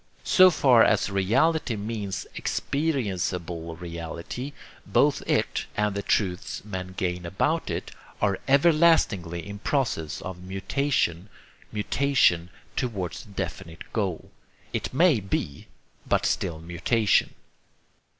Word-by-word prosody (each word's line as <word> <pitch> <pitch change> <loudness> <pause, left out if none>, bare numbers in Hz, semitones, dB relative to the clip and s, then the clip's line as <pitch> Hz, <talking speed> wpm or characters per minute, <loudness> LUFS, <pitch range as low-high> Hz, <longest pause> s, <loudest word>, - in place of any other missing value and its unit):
So 185 -1 +7
far 130 -8 +5
as 105 -1 +2
reality 125 - +2
means 105 -2 -4
experienceable 90 - -2
reality, 85 - -6 0.3
both - - +2
it - - 0
and 105 -1 +1
the 100 - -2
truths 95 -1 -1
men 95 -3 -6
gain 90 -1 -1
about 125 - 0
it - - -4 0.3
are 100 -2 +1
everlastingly 140 - +3
in 100 0 -7
process 110 - -1
of 95 -1 -7
mutation 95 - -1 0.4
mutation 105 -6 +2 0.3
towards 100 -9 -3
a - - -18
definite 85 -5 -6
goal, 95 -7 -2 0.4
it - - -2
may 155 -2 +4
be 90 -7 -3 0.4
but - - +2
still 85 -4 0
mutation. 90 +6 +1
100 Hz, 110 wpm, -26 LUFS, 90-130 Hz, 0.4 s, So